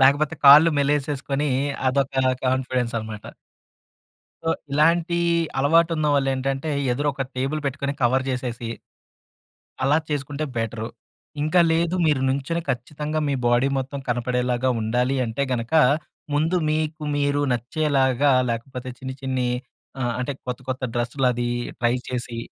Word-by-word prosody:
లేకపోతే 145 +4 +4
కాళ్ళు 150 +4 +10
మెలేసేసుకొని 145 0 0 0.4
అదొక 135 +1 0 0.3
కాన్ఫిడెన్స్ 130 -2 0
అనమాట. 110 -1 -8 1.2
సో, 165 - +1 0.2
ఇలాంటి 165 +3 +3 0.4
అలవాటున్నవాళ్లేంటంటే, 145 -2 +2 0.2
ఎదురు 145 +4 0
ఒక 135 - -2
టేబుల్ 135 +4 -1
పెట్టుకొని 140 +1 -2
కవర్ 130 +2 +3
చేసేసి 120 -2 -4 1.2
అలా 145 +3 +4
చేసుకుంటే 145 +1 -3
బెటరు. 115 0 -2 0.5
ఇంకా 155 +4 +3
లేదు 170 +2 +1
మీరు 145 -4 +2
నించొని 140 +6 -1
ఖచ్చితంగా, 150 +5 -3
మీ 140 - +1
బాడీ 120 +3 +3
మొత్తం 135 +2 -4
కనపడేలాగా 125 +1 0
ఉండాలి 125 +4 0
అంటే 115 +5 -2
గనక, 120 +2 -3 0.6
ముందు 160 +5 +1
మీకు 155 +1 -1
మీరు 145 0 +1
నచ్చేలాగా, 135 +1 +2 0.2
లేకపోతే 125 +2 -5
చిన్ని 130 0 -6
చిన్ని 130 -2 -1 0.5
ఆహ్, 120 -2 0
అంటే 130 +3 -2
కొత్త 125 +1 -4
కొత్త 130 0 -3
డ్రెస్సులది 120 0 0 0.3
ట్రై 120 0 +2
చేసి, 120 -2 -4
135 Hz, 115 wpm, -23 LUFS, 125-150 Hz, 1.2 s, కాళ్ళు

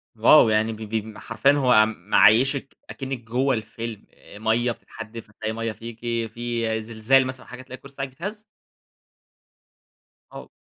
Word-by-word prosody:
واو! 115 +2 +6
يعني 110 +1 +1
ب - - -9
ب 110 -1 -4
حرفيًا 115 +4 +2
هو 125 -6 +5
معيّشك 110 +7 +3
أكنَّك 135 -1 -5
جوّه 130 +4 0
الفيلم. 110 0 -6 0.3
مَيّة 115 +3 +1
بتتحدِّف، 115 -1 -10
هتلاقي 110 +1 -5
مَيّة 115 0 -3
فيكِ، 115 +1 -10 0.3
في 115 -2 -2
زلزال 115 +4 +2
مثلًا 130 0 -7
حاجة 125 0 -10
تلاقي 130 0 -10
الكُرسي 140 +1 -14
بتاعِك 135 0 -4
بيتهز؟ 205 +11 -7 1.9
آه. - - -10
115 Hz, 135 wpm, -24 LUFS, 110-130 Hz, 1.9 s, واو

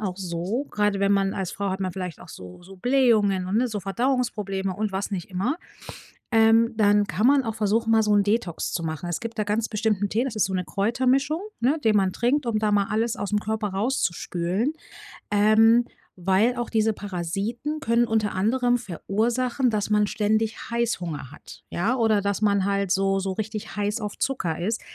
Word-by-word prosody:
auch 190 -4 -3
so, 185 +7 -3
grade 210 -1 0
wenn 200 0 +3
man 195 -1 +2
als 190 -3 -3
Frau 200 -1 -2
hat 190 +1 -3
man 185 -2 -2
vielleicht 180 -4 -6
auch - - -13
so 90 - -11
so 195 +2 -13
Blähungen 215 -5 +2
und, 195 +3 -1
ne, 250 +2 +3
so 210 -2 -4
Verdauungsprobleme 195 -3 -1
und 210 0 -2
was 195 +2 -3
nicht 185 -2 -4
immer. 200 - -1 0.7
Ähm, 225 +1 +4
dann 205 -1 +4
kann 215 +4 0
man 275 -1 +4
auch 225 -1 -3
versuchen, 225 +2 +1
mal 220 -1 +5
so 210 -1 +1
'n 205 - +5
Detox 205 -5 -1
zu 170 - -2
machen. 160 +2 -4
Es 175 - -3
gibt 230 -1 -7
da 215 - +1
ganz 210 +2 -1
bestimmten 210 -2 0
Tee. 230 +6 0
Das 240 -5 -4
ist 215 - +3
so 190 - -3
'ne 180 - -1
Kräutermischung, 260 - +1 0.2
ne, 275 +7 +2
die 220 - +3
man 190 -3 +2
trinkt, 250 +3 0
um 220 -2 +1
da 215 -1 +1
mal 200 -1 +3
alles 225 +2 0
aus'm 205 +1 -1
Körper 215 -1 -2
raus 215 +8 -1
zu 175 - +2
spülen, 185 - -2 0.6
ähm, 220 +3 +5 0.4
weil 195 +7 +2
auch 240 - -3
diese 220 -1 +2
Parasiten 205 - -4
können 235 -1 +2
unter 215 -3 0
anderem 245 +5 +2
verursachen, 235 - -1
dass 210 -2 -1
man 210 -1 +3
ständig 215 +1 0
Heißhunger 180 - -2
hat, - - -13
ja, 205 +9 0
oder 220 -3 +3
dass 200 +1 -2
man 200 -2 +3
halt 200 -1 0
so 195 0 +2
so 190 0 -2
richtig 215 +1 -5
heiß 205 +2 -1
auf 210 -1 -5
Zucker 180 -12 -1
ist. 220 +6 -1
210 Hz, 200 wpm, -24 LUFS, 195-230 Hz, 0.7 s, mal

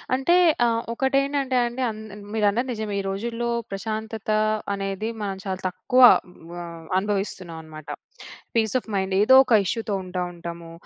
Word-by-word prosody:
అంటే 305 +7 +3 0.3
ఆహ్, 230 0 +1
ఒకటేంటంటే 275 +1 +1
అండి 240 +2 -4
అన్ 215 0 -7 0.3
మీరన్నది 220 +4 +1
నిజమే. 215 -2 -4
ఈ - - -8
రోజుల్లో 235 +4 -3 0.2
ప్రశాంతత 220 +2 -4 0.4
అనేది 195 +2 -3
మనం 195 -2 -3
చాలా 190 -1 -3
తక్కువ 250 +7 +1 0.6
ఆహ్, 170 -1 -9
అనుభవిస్తున్నామనమాట. 170 -6 -4 0.7
Piece 220 -2 +2
of 240 - -6
mind. 190 0 -1
ఏదోక 260 +3 +6
ఇష్యూ‌తో 220 +1 -2
ఉంటా 180 0 -4
ఉంటాము. 170 -1 -8
215 Hz, 125 wpm, -24 LUFS, 190-235 Hz, 0.7 s, ఏదోక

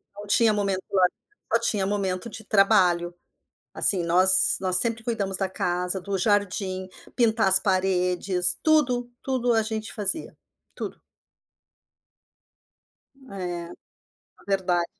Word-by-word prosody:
Não 205 +1 -11
tinha 220 +2 +2
momento 200 -2 -2
de - - -6
lazer, 180 -2 +2 0.4
só 230 - +3
tinha 210 -4 0
momento 195 +1 -4
de 220 0 -9
trabalho. 190 -4 +1 0.6
Assim, 185 -4 +5
nós 185 +2 +6
nós 185 -1 +3
sempre 230 +1 +1
cuidamos 200 -5 -2
da 195 - -2
casa, 180 +1 -2
do 195 +2 -4
jardim, 190 -1 -2 0.3
pintar 225 -3 +1
as 190 0 +5
paredes, 180 -1 0
tudo 250 -6 0
tudo 250 -3 -2
a 225 - +1
gente 220 0 -6
fazia, 210 +8 +1 0.4
tudo. - - -8 2.4
É. 175 -2 -6 0.8
Verdade. 185 -3 -1
195 Hz, 120 wpm, -23 LUFS, 185-220 Hz, 2.4 s, nós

